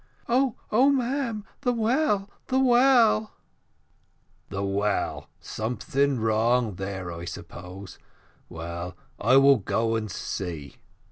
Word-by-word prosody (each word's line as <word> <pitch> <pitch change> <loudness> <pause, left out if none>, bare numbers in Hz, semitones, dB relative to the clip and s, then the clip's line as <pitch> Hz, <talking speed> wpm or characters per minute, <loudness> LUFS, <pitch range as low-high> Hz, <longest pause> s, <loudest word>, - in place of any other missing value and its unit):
"Oh, 255 0 +2 0.2
oh, 255 +6 +5
ma'am! 255 -5 -1 0.2
the 250 -3 +1
well, 230 -3 +1 0.2
the 260 - +1
well 245 -4 +4 0.6
" - - -40
"The 100 0 -3
well! 100 +1 -1
Something 125 +4 -1
wrong 115 +1 +2
there, 95 -2 -5
I 85 0 -7
suppose: 90 +2 -9 0.5
well, 85 +2 -6 0.2
I 125 +5 +5
will 135 0 +7
go 115 +2 0
and 110 -1 -2
see." 85 -6 -5
120 Hz, 115 wpm, -26 LUFS, -, 0.6 s, will